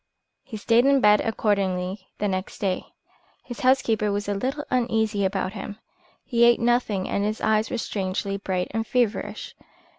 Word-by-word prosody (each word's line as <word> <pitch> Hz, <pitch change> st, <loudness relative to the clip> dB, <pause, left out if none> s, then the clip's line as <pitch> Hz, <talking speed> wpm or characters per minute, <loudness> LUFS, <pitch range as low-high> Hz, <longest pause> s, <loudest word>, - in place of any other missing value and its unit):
He 230 Hz, -5 st, -8 dB
stayed 230 Hz, +4 st, +3 dB
in 275 Hz, 0 st, +5 dB
bed 210 Hz, -3 st, +5 dB
accordingly 190 Hz, -3 st, -1 dB
the 205 Hz, -, -1 dB
next 185 Hz, -1 st, -3 dB
day. 190 Hz, -3 st, -2 dB, 0.6 s
His 245 Hz, -, -8 dB
housekeeper 225 Hz, -5 st, +2 dB
was 205 Hz, 0 st, -2 dB
a 205 Hz, -, 0 dB
little 270 Hz, +9 st, -3 dB
uneasy 220 Hz, -4 st, +1 dB
about 190 Hz, 0 st, -1 dB
him. 205 Hz, 0 st, -7 dB, 0.5 s
He 235 Hz, -2 st, +2 dB
ate 235 Hz, 0 st, +6 dB
nothing 235 Hz, -5 st, +1 dB
and 200 Hz, -, -1 dB
his 215 Hz, +1 st, -2 dB
eyes 220 Hz, 0 st, +1 dB
were -, -, -2 dB
strangely 195 Hz, -2 st, -2 dB
bright 185 Hz, -2 st, -2 dB
and 225 Hz, +1 st, -2 dB
feverish. 240 Hz, -4 st, -1 dB
210 Hz, 160 wpm, -24 LUFS, 195-235 Hz, 0.6 s, ate